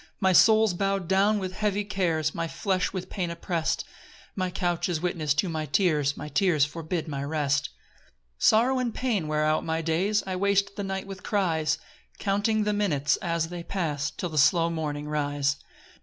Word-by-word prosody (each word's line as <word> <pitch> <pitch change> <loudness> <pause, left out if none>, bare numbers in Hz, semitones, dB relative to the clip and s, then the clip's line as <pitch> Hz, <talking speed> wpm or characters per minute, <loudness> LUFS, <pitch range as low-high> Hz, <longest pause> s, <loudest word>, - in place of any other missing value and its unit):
2 - - -45
My 190 -2 +3
soul's 220 +1 +6
bow'd 195 0 -1
down 195 +3 +3
with 185 -2 -4
heavy 205 0 0
cares, 170 -7 0
My 165 0 -2
flesh 185 +2 -1
with 185 -1 -5
pain 180 -3 -3
oppress'd; 170 -1 -2 0.5
My 185 -2 -1
couch 175 -1 -1
is 170 -3 -1
witness 160 -4 0
to 175 +5 +1
my 155 -2 -3
tears, 150 -2 +1
My - - -6
tears 160 -4 +2
forbid 165 +2 -4
my 140 -2 -4
rest. 145 -1 0 0.4
3 - - -38 0.3
Sorrow 250 +4 +4
and 240 -3 -2
pain 220 -11 -1
wear 155 0 +1
out 155 0 +1
my 160 0 -1
days; 185 +6 +1
I 185 -1 -3
waste 200 +1 +1
the 205 - -4
night 190 0 -3
with 195 -1 -8
cries, 160 -6 0 0.4
Counting 205 +2 +1
the 210 0 0
minutes 150 -9 +1
as 165 -2 -1
they 175 0 -6
pass, 155 -5 -2
Till 180 - -5
the 155 -2 0
slow 165 +4 +4
morning 150 -2 -3
rise. 145 -1 0
175 Hz, 185 wpm, -27 LUFS, 155-195 Hz, 0.5 s, soul's